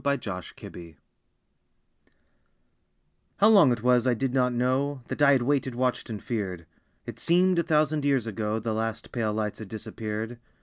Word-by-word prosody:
Beyond 140 0 +1
the - - -5
Tops 90 -2 -7
of - - -9
Time 85 -2 -11 2.4
How 210 - +5
long 195 - +6
it 120 -2 -2
was 125 0 +3
I 125 - +3
did 130 +2 -2
not 125 -2 +2
know, 130 +2 -1
That - - -4
I 140 -1 +6
had 130 -3 +2
waited, 135 -1 0
watched, 125 0 -1
and 110 -2 -5
feared. 95 -8 -4 0.4
It - - -8
seemed 180 +1 +3
a - - +4
thousand 155 -2 +1
years 135 -5 +1
ago 110 0 -2
The 110 0 -3
last 110 0 -4
pale 115 -3 -1
lights 105 -1 -3
had 110 - -8
disappeared. 110 +2 -6
120 Hz, 180 wpm, -26 LUFS, 110-140 Hz, 2.4 s, long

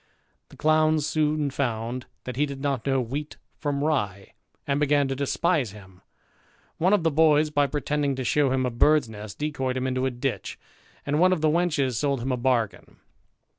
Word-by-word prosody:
The - - -16
clowns 155 -1 +3
soon 155 -2 0
found 120 -1 -3 0.2
that 125 - -6
he 145 +3 +1
did 140 -1 -7
not 135 -3 -2
know 135 -1 +2
wheat 140 +5 -4 0.2
from 145 -1 -1
rye, 105 -11 -1 0.3
and 140 0 0
began 145 -1 +2
to 135 - -1
despise 140 - 0
him; 95 -3 -15 0.8
one 180 +4 +3
of 205 -5 +3
the 165 - +2
boys, 155 0 +4
by 145 -1 +2
pretending 145 0 -1
to 130 - -3
shew 140 +2 +2
him 130 -1 +1
a 125 - -1
bird's 150 +3 +3
nest, 105 -2 -9
decoyed 135 -4 -2
him 130 - -2
into 130 0 0
a - - +1
ditch; 125 +1 -4 0.5
and 145 +2 0
one 185 +2 +5
of 180 -4 0
the 155 -1 +3
wenches 150 -7 +1
sold 140 -2 0
him 130 - -1
a 125 - 0
bargain. 120 -7 -1
140 Hz, 190 wpm, -25 LUFS, 125-150 Hz, 0.8 s, one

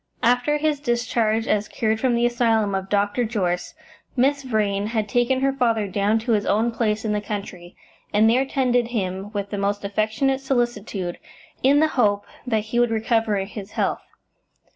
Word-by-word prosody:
After 245 +5 +3
his 300 -1 0
discharge 235 -4 0
as 210 -1 +1
cured 220 -1 -1
from 250 0 +2
the 235 0 +2
asylum 225 -4 +2
of 190 0 -3
Dr. 205 +4 +1
Jorce, 185 -6 -2 0.4
Miss 275 +3 +2
Vrain 210 -5 0
had 220 -2 -1
taken 245 +4 +1
her 270 0 +2
father 230 -5 +1
down 200 +3 +1
to 235 +1 -2
his 210 -2 +2
own 225 +3 +2
place 220 -1 -1
in 215 - 0
the 210 - -1
country, 200 -4 -6 0.4
and 210 +2 +4
there 245 +4 +4
tended 250 -3 +1
him 195 -4 -3
with 200 -2 -4
the 205 - -3
most 200 +1 -1
affectionate 220 +7 0
solicitude, 230 -8 -2 0.4
in 280 +3 +4
the 315 - +3
hope 205 -7 +1 0.2
that 220 -3 +1
he 225 +3 -2
would 240 -1 +3
recover 225 -1 +1
his 205 0 -9
health. - - -1
220 Hz, 175 wpm, -23 LUFS, 205-245 Hz, 0.4 s, and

